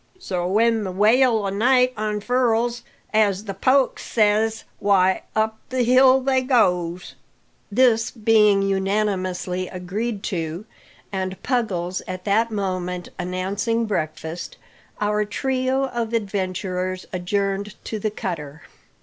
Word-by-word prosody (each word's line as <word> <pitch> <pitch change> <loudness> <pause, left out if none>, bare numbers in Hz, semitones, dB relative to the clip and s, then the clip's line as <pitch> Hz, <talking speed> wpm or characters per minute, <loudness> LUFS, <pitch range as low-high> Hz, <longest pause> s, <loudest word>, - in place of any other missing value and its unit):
So, 180 - -3
when 225 +3 +2
the 190 - -3
wail 220 +3 +3
o' - - 0
night 250 +5 +3
unfurls, 230 +2 0 0.3
as 205 -2 +2
the 200 -2 -5
poic 260 +7 +2
says, 220 0 +1 0.2
why, 190 -2 +3
up 220 0 0
the 255 -1 0
hill 260 +2 +5
they 260 0 +2
goes." 180 -9 +1 0.6
This 225 0 +3
being 210 -3 +3
unanimously 190 -2 -1
agreed 200 +4 -4
to, 170 0 -3 0.5
and 190 -1 -3
Puggles 190 -8 -1
at 185 0 -5
that 220 +3 +2
moment 185 -4 -3
announcing 195 +6 -1
breakfast, 160 -4 -4 0.4
our 210 0 +1
trio 260 +4 0
of 235 -2 -3
adventurers 185 -3 -2
adjourned 195 +2 -2
to 220 - -4
the 215 - -1
cutter. 160 -8 -6
205 Hz, 115 wpm, -22 LUFS, 185-230 Hz, 0.6 s, hill